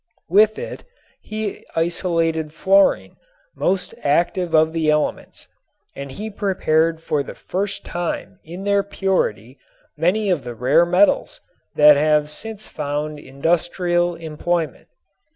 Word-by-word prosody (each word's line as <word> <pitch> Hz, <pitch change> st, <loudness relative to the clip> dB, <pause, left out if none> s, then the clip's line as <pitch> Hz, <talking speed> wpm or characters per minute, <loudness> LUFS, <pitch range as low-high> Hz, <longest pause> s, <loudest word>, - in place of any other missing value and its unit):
With 215 Hz, +4 st, +4 dB
it -, -, -7 dB, 0.4 s
he 215 Hz, -1 st, -5 dB
isolated 165 Hz, -2 st, 0 dB
fluorine, 195 Hz, +4 st, +2 dB, 0.4 s
most 185 Hz, 0 st, 0 dB
active 170 Hz, +3 st, +1 dB
of 160 Hz, +1 st, +4 dB
the 160 Hz, -2 st, 0 dB
elements, 150 Hz, 0 st, -1 dB, 0.5 s
and 140 Hz, 0 st, -7 dB
he 215 Hz, +9 st, -6 dB
prepared 165 Hz, -5 st, +1 dB
for 150 Hz, -3 st, 0 dB
the -, -, -8 dB
first 200 Hz, +2 st, -4 dB
time 175 Hz, -1 st, -4 dB
in 175 Hz, +4 st, -8 dB
their 200 Hz, 0 st, +2 dB
purity 185 Hz, -, -2 dB, 0.4 s
many 190 Hz, +6 st, +1 dB
of 160 Hz, -7 st, 0 dB
the 120 Hz, -1 st, -7 dB
rare 140 Hz, +9 st, +3 dB
metals 180 Hz, +4 st, +2 dB, 0.4 s
that 150 Hz, -1 st, +7 dB
have 150 Hz, 0 st, +2 dB
since 220 Hz, +5 st, -7 dB
found 150 Hz, 0 st, -4 dB
industrial 175 Hz, +4 st, 0 dB
employment. 165 Hz, +1 st, -3 dB
165 Hz, 120 wpm, -21 LUFS, 150-190 Hz, 0.5 s, that